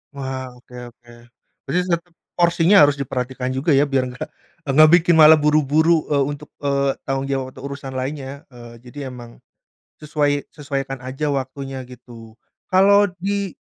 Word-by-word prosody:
Wah, 130 -2 -5
oke 125 0 -17 0.2
oke 120 +1 -25 0.5
berarti 180 - -1
tetep 170 0 -2 0.2
porsinya 170 +2 +3
harus 145 -1 +4
diperhatikan 130 -1 -4
juga 135 +5 0
ya, 140 0 +4
biar 135 -2 0
enggak 125 - -7 0.4
enggak 155 +3 +6
bikin 175 0 +2
malah 155 0 +8
buru-buru, 155 +2 +2
eee, 140 -1 +3
untuk, 145 +1 -9
eee, 140 -1 0
tanggung 135 0 -2
jawab 135 -1 -1
atau - - -12
urusan 140 -1 -8
lainnya. 135 +2 -5
Eee, 120 -1 -13
jadi 135 +3 -8
emang 120 -2 -11 0.6
sesuai 145 -1 -1
sesuaikan 135 -3 -5
aja 130 +4 -4
waktunya 135 0 -5
gitu. 115 -3 -14 0.3
Kalau 200 +2 +5
di 200 -1 -3
140 Hz, 150 wpm, -20 LUFS, 130-155 Hz, 0.6 s, malah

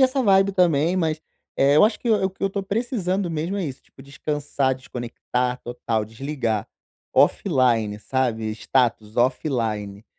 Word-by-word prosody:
essa 265 +1 +3
vibe 195 -2 +4
também, 175 -2 +3
mas, 160 -3 0 0.4
eh, 140 +2 +4
eu 155 - +7
acho 215 0 +1
que 240 - -1
o 210 -3 +3
o 190 - +1
que 190 - -15
eu 195 - +3
estou 195 0 -4
precisando 200 -4 -1
mesmo 165 +5 -2
é 195 - -1
isso, 135 -4 -6
tipo, 135 - -17
descansar, 140 -1 -1
desconectar 125 0 -3
total, 115 -2 -2
desligar, 115 -2 -3 0.5
offline, 120 - +3
sabe, 115 -3 -1
status 115 -2 0
offline, 115 -6 -1
140 Hz, 155 wpm, -23 LUFS, 120-185 Hz, 0.5 s, eu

